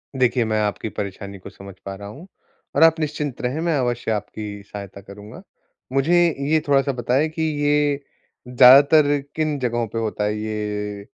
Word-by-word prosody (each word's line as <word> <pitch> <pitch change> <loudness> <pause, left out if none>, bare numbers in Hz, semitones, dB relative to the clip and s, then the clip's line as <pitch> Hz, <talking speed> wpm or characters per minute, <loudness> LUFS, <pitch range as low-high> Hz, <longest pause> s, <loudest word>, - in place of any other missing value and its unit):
देखिए, 125 -1 +2
मैं 110 -1 0
आपकी 105 +1 -2
परेशानी 100 0 -6
को - - -11
समझ 100 0 -12
पा 100 0 -5
रहा 100 +1 -9
हूँ, 145 - -11 0.5
और 145 - +5
आप 165 0 +5
निश्चिंत 150 -3 -3
रहें, 130 +5 -2
मैं 165 -3 0
अवश्य 120 -2 -2
आपकी 105 -1 -5
सहायता 100 -1 -9
करूँगा। 105 - -12 0.5
मुझे 145 +6 +2 0.3
ये 155 0 +3
थोड़ा-सा 140 0 +2
बताएँ 125 +5 0
कि 160 +1 -6 0.2
ये 145 -1 +2 0.5
ज़्यादातर 140 +4 +6 0.2
किन 155 -2 -1
जगहों 120 -2 -1
पे 110 - -7
होता 110 -2 -2
है? 105 +1 -1
ये, 105 -1 -4
120 Hz, 165 wpm, -21 LUFS, 105-145 Hz, 0.5 s, ज़्यादातर